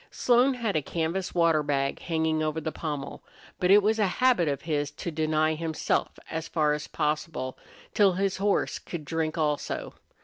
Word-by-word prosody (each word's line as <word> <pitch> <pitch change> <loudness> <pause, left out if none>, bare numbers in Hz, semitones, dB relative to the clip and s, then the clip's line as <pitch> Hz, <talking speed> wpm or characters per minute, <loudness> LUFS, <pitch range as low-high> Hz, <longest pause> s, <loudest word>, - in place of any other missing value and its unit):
Slone 250 +2 +3
had 230 -5 -2
a 155 - +2
canvas 170 +6 -2
water 165 -3 +4
bag 140 -2 -1
hanging 160 -2 0
over 155 +1 -1
the 160 0 -3
pommel, 150 -4 -5 0.4
but 180 - +1
it 205 +1 +7
was 220 +2 +2
a 210 - +3
habit 250 -10 +4
of 140 -1 -2
his 145 -3 -1
to 150 +3 -6
deny 155 0 +1
himself, 160 0 -1
as 160 0 -3
far 155 -2 +1
as 150 - -4
possible, 150 -3 -2 0.4
till 200 -3 +4
his 195 +1 0
horse 200 +1 0
could 165 -4 -7
drink 160 +1 -2
also. 150 -2 -1
160 Hz, 175 wpm, -27 LUFS, 150-185 Hz, 0.4 s, it